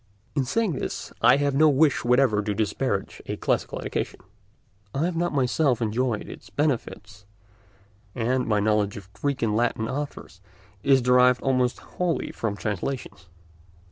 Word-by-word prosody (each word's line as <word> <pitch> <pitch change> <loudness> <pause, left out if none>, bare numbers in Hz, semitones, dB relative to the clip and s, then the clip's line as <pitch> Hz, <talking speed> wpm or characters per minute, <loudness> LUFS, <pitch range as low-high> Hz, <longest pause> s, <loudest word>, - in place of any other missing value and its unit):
In 140 -3 +1
saying 220 - 0
this 135 - -5
I - - +6
have 145 -1 +1
no 155 +3 +5
wish 145 0 +3
whatever 125 -3 +3
to 105 -1 -2
disparage 105 0 -2
a - - -3
classical - - -1
education. - - -3 0.8
I 145 +4 +1
have 175 -1 -2
not 175 +1 0
myself 135 -1 +1
enjoyed 115 0 -1
its - - -11
benefits, 110 -8 -3 0.9
and 125 +2 0
my 105 -2 +2
knowledge 105 -1 +1
of 100 -1 -12
Greek 140 -3 -2
and 105 -2 +1
Latin 115 -1 0
authors 135 -8 -6 0.4
is 135 0 +4
derived 125 0 +4
almost 125 -2 +1
wholly 180 -2 -2
from 105 -3 -3
translations. 110 0 -4
125 Hz, 145 wpm, -25 LUFS, 105-140 Hz, 0.9 s, I